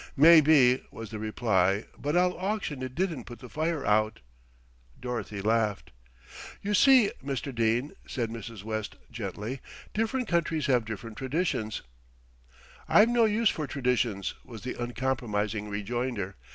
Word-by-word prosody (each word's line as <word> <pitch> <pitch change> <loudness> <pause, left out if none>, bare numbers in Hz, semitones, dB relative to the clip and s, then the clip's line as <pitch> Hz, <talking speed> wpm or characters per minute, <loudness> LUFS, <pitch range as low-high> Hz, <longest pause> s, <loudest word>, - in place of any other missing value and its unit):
"Maybe," 150 -4 +7
was 110 -2 -9
the 110 - -5
reply, 105 -3 +1
"but 150 +4 -1
I'll 180 0 +3
auction 185 -7 -3
it 130 0 -5
didn't 165 -9 -1
put 120 - -9
the 125 - -11
fire 160 +1 -1
out." 110 +1 +2 0.8
Dorothy 120 -5 -4
laughed. 110 -2 0 0.7
"You 205 +1 -1
see, 250 0 +6
Mr. 135 0 -3
Dene," 115 +4 +1 0.2
said 115 -4 -2
Mrs. 115 -2 -8
West 110 -1 -4 0.2
gently, 110 +3 -5 0.3
"different 225 +3 -1
countries 165 -3 0
have 125 -5 +2
different 110 0 -7
traditions 130 -6 -1 0.6
" - - -29 0.3
"I've 215 +2 +6
no 240 -1 +4
use 220 0 +3
for 155 -3 -4
traditions," 120 -6 0
was 115 -4 -10
the 125 - -3
uncompromising 115 -4 -2
rejoinder. 105 -1 -3
125 Hz, 140 wpm, -28 LUFS, 110-155 Hz, 0.8 s, Maybe